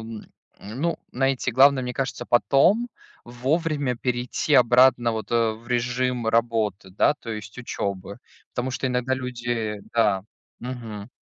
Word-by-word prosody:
м, 110 -1 -8 0.4
ну, 135 +12 -3 0.2
знаете, 135 -1 0
главное, 135 +2 +5
мне 125 0 -4
кажется, 130 -2 -3
потом 175 - +3 0.4
вовремя 140 +2 -1
перейти 125 +4 -1
обратно 125 -1 +5
вот, 110 -1 -5
э, 115 -1 +2
в 115 +2 -13
режим 125 0 0
работы, 110 -4 0
да, 100 +9 +3
то 115 - -7
есть 110 0 -7
учёбы, 100 -4 -4 0.3
потому 125 +1 -2
что 130 - -2
иногда 125 +1 0
люди 120 -4 -3
Да, 105 -5 +2 0.4
мгм. 115 -4 -7
120 Hz, 135 wpm, -24 LUFS, 115-130 Hz, 0.4 s, главное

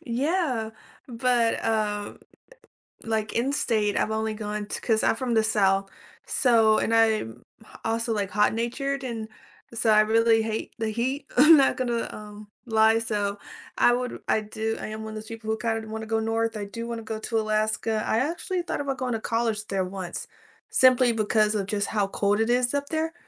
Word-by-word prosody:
Yeah, 255 -2 -1 0.4
but, 240 -1 +1
uh, 210 -2 -1 0.9
like 220 -1 -1
in 245 +4 0
state 215 -7 0
I've - - 0
only 220 0 -1
gone 210 -1 -4
t 205 - -5
'cause 220 -2 +1
I'm - - +3
from 245 -1 -2
the 220 -1 +3
South 195 -3 +2 0.4
so 225 -4 +3
and 230 - 0
I'm 220 - +1 0.2
h 220 - -18 0.2
also, 230 +1 -1
like, 200 -2 -2
hot-natured, 235 +6 0
and 225 -3 -4 0.5
so 230 0 0
I 215 0 +6
really 225 +1 +3
hate 220 0 -4
the 225 -1 -1
heat. 250 +6 -2
I'm 305 +5 +9
not 275 - +3
gonna, 240 -2 -1
um, 210 0 -10 0.2
lie 220 -1 +4
so, 205 -3 -2 0.4
I 240 - +5
would 250 +1 -3
I - - +3
do 220 +1 -3
I - - -5
am 215 0 -6
one 220 - -6
of - - -7
those 215 0 -7
people 225 -1 -8
who 220 - 0
kinda 225 -1 -2
wanna 220 0 -5
go 225 0 0
north, 225 0 -1
I 205 - -4
do 230 +3 -6
wanna 230 -1 -5
go 220 0 -5
to 225 0 -1
Alaska. 215 0 0
I 225 - +1
actually 345 +6 -2
thought 345 - -3
about 275 -2 -3
going 250 -2 -2
to 225 - -1
college 225 -2 -1
there 195 -1 -1
once 185 -2 -6 0.4
simply 255 -1 +5
because 215 -1 +1
of 195 -2 -1
just 205 -1 -1
how 205 -3 0
cold 200 +1 0
it 225 +1 +1
is 245 +1 +2
up 285 0 -1
there, 320 +1 -1
225 Hz, 195 wpm, -25 LUFS, 215-235 Hz, 0.9 s, I'm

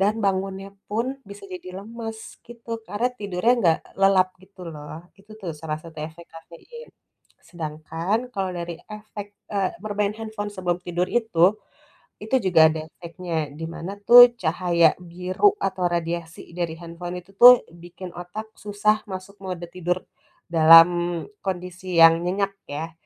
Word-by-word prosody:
Dan 210 +3 +2
bangunnya 195 0 -1 0.2
pun, 240 +6 -2
bisa 200 0 -11
jadi 185 0 -8
lemes, 225 0 -8
gitu. 230 -1 -7
Karena, 205 +6 -1
tidurnya 200 +3 +1
nggak 165 -3 +3 0.2
lelap, 195 -1 +5
gitu 190 -1 -15
loh. 155 +3 -10
Itu 205 +2 -16
tuh, 180 -5 -4
salah 155 -1 -4
satu 165 -2 -12
efek 160 +2 -9
kafein. 170 - -13 0.5
Sedangkan, 165 +4 -3 0.2
kalau 190 -2 -1
dari 170 -1 -6
efek, 210 -1 -8 0.3
eee, 195 -2 +1
bermain 205 -1 -1
handphone 220 -2 -5
sebelum 180 -3 -2
tidur 175 0 -1
itu, 210 -5 +3 0.7
itu 220 +5 +1
juga 160 -4 +6
ada 160 0 -4
efeknya. 170 -2 -5
Di 165 - -5
mana, 170 +3 -6
tuh, 245 0 +10
cahaya 170 -1 +3
biru 180 - +1
atau 190 -1 -2
radiasi 170 0 -4
dari 170 -2 -2
handphone 175 +1 -7
itu 195 - -21
tuh, 245 +3 +9
bikin 175 +2 -10
otak 180 +5 -7
susah 210 +1 +1
masuk 190 +2 -8
mode 180 -2 -5
tidur, 180 0 -2 0.5
dalam 165 0 +9 0.6
kondisi 180 -1 -4
yang 165 0 +8
nyenyak, 195 +2 0 0.2
ya. 160 +3 -5
185 Hz, 145 wpm, -24 LUFS, 170-205 Hz, 0.7 s, tuh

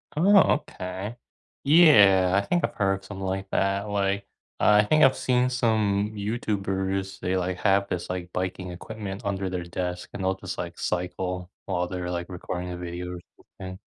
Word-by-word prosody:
Oh, 195 +6 +6
okay. 95 -4 -5 0.5
Yeah, 105 - +6
I - - -8
think 175 - +1
I've - - -1
heard 95 -2 +1
of 95 - -18
something 95 -1 -6
like 95 +1 -3
that, 100 +2 0
like, 100 -1 0 0.3
I 105 0 +5
think 155 +7 +4
I've 135 - +5
seen 125 0 +2
some 110 -4 +1
YouTubers, 95 -3 -2
they, 90 +1 -1
like, 90 0 -2
have 100 +1 +2
this, 90 -1 -3
like, 90 -1 -4
biking 95 0 -3
equipment 100 +3 -7
under 95 -1 -1
their 90 -1 -3
desk, 90 0 -4
and 100 - -5
they'll, 95 0 +1
just, 95 -1 -7
like, 85 -1 -5
cycle 90 0 -3
while 90 -2 -1
they're, 90 -1 -4
like, 85 0 -4
recording 90 0 -5
a 90 - -5
video 90 +1 -5
or - - -7 0.4
something. 95 0 -7
95 Hz, 175 wpm, -26 LUFS, 90-105 Hz, 0.5 s, Oh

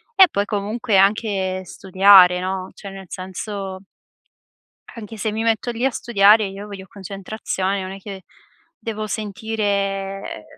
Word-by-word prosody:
E 380 -2 +8
poi 200 0 0
comunque 210 +1 -1
anche 195 -2 +1
studiare, 190 -1 +5
no, 185 0 -3
cioé 200 - -9
nel 195 0 -10
senso 190 +1 -6 1.1
anche 225 -1 -9
se 215 0 -2
mi 220 - -2
metto 230 +1 0
lì 235 +2 -3
a 270 - +3
studiare, 215 -3 +4
io 195 +2 -8
voglio 195 -2 -9
concentrazione, 195 0 -4
non 185 - -6
è 195 - -8
che 195 -1 -9 0.6
devo 215 -2 -4
sentire 215 +1 -4
ehm, 195 - -2
200 Hz, 140 wpm, -21 LUFS, 190-215 Hz, 1.1 s, E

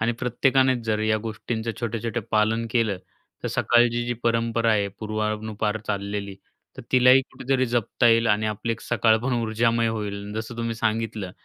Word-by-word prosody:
आणि 115 +2 +1
प्रत्येकानेच 130 +1 +2
जर 110 -1 0
या 110 0 +2
गोष्टींचं 110 +1 -4
छोट्या-छोट्या 115 0 -3
पालन 110 +2 +2
केलं, 110 -6 +1 0.4
तर - - -2
सकाळची 120 0 +2
जी 120 - -1
परंपरा 115 0 +1
आहे 100 -1 +1
पूर्वानुपार 110 0 -2
चाललेली, 100 -1 -3 0.4
तर - - -8
तिलाही 130 +1 +7
कुठेतरी 130 0 0
जपता 120 0 +1
येईल 115 0 +4
आणि 105 0 +2
आपली 110 +2 -2
एक 115 - -7
सकाळ 110 -1 +2
पण 135 - 0
ऊर्जामय 115 +1 +1
होईल. 105 -2 -4
जसं 110 +2 -5
तुम्ही 115 -1 -2
सांगितलं, 110 -3 -2
115 Hz, 155 wpm, -24 LUFS, 110-120 Hz, 0.4 s, तिलाही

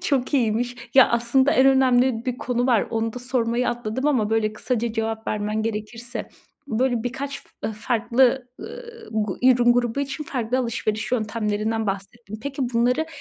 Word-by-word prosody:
Çok 275 0 0
iyiymiş. 245 0 +1 0.2
Ya 265 -1 +8
aslında 240 +4 +3
en 260 - +5
önemli 255 -3 +3
bir 255 -1 -3
konu 245 0 -1
var. 235 -5 +3
Onu 225 -1 -1
da 250 - -6
sormayı 245 -1 0
atladım 240 +3 -2
ama, 230 -8 +2
böyle, 220 -1 +1
kısaca 235 +1 -2
cevap 225 0 -3
vermen 215 +1 -1
gerekirse, 225 +3 -5 0.4
böyle, 245 -1 0
birkaç 275 +3 -4
f 220 - -6
farklı, 240 +3 +1
ııı, 470 -1 -10
gu 210 -3 -2
ürün 245 -1 +5
grubu 240 +2 0
için 280 +2 -4
farklı 250 -2 -1
alışveriş 225 -2 -2
yöntemlerinden 220 -1 -1
bahsettin. 200 +2 -5
Peki, 275 -1 -3
bunları 250 +7 +2
240 Hz, 155 wpm, -23 LUFS, 220-260 Hz, 0.4 s, Ya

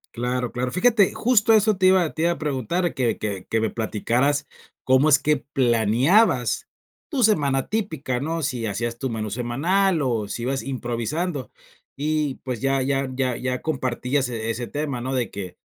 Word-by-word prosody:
Claro, 125 0 -2
claro, 125 +1 -3
fíjate, 210 +1 +3
justo 225 -2 +3
eso 215 -2 +4
te 185 - +2
iba 185 -4 +4
te 160 - -2
iba 170 - +3
a - - -3
preguntar 150 - -1
que 125 -3 0
que 100 -3 -4
que 110 - +1
me 110 - +1
platicaras 120 +6 0 0.4
cómo 130 +3 +4
es 145 -2 +6
que 150 +1 +2
planeabas 130 - +2 0.4
tu 270 -5 0
semana 145 - +2
típica 160 - -2
¿no? 165 +4 -2
Si 125 -5 -2
hacías 115 +3 -3
tu 135 -2 -2
menú 110 -1 -3
semanal, 155 - +1
o 115 -6 -1
si 115 - -5
ibas 135 +2 -1
improvisando, 130 - -3 0.5
y 150 -1 -1
pues, 125 -3 -4
ya 135 0 +1
ya 135 0 0
ya 130 -2 0
ya 125 0 -3
compartías 130 -2 -1
e 115 -2 -4
ese 120 +1 -3
tema, 145 -4 -3
¿no?, 130 +2 -3
de 125 -3 -1
que 95 -3 -7
135 Hz, 175 wpm, -23 LUFS, 120-160 Hz, 0.5 s, es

